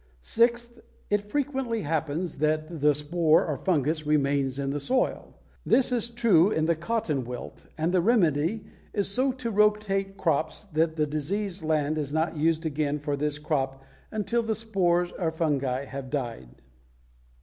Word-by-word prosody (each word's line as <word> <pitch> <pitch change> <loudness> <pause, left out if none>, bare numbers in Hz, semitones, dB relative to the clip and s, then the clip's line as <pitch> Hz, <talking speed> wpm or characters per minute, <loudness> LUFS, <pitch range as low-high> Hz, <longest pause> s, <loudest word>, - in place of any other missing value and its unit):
Sixth, 235 - +2 0.3
it 205 0 +3
frequently 265 -4 -1
happens 160 +2 -2
that 155 +1 -1
the 150 0 +4
spore 155 +2 +2
or 150 - -2
fungus 155 0 0
remains 140 -3 +1
in 140 -1 -2
the 145 - -2
soil. 255 - -1 0.3
This 260 -1 +4
is 235 -1 +1
true 220 -7 +4
in 160 -7 0
the 165 +1 +2
cotton 160 - -1
wilt, 125 0 -8
and 160 +2 0
the 180 -1 +3
remedy 185 - +2 0.3
is 205 -2 +1
so 255 +7 +2
to 250 -3 -4
rotate 205 -2 +1
crops 160 -3 0
that 160 +1 +1
the 155 -1 +1
diseased 180 +7 -1
land 155 -1 0
is 145 -2 -2
not 160 +2 0
used 160 +2 +1
again 150 -1 -1
for 145 0 -2
this 145 +1 -1
crop 135 -3 -2 0.3
until 220 +2 0
the 225 -1 -1
spores 180 -6 +1
or 170 -3 +1
fungi 140 -5 -1
have 135 -1 -7
died. 120 - -4
160 Hz, 160 wpm, -27 LUFS, 150-210 Hz, 0.3 s, the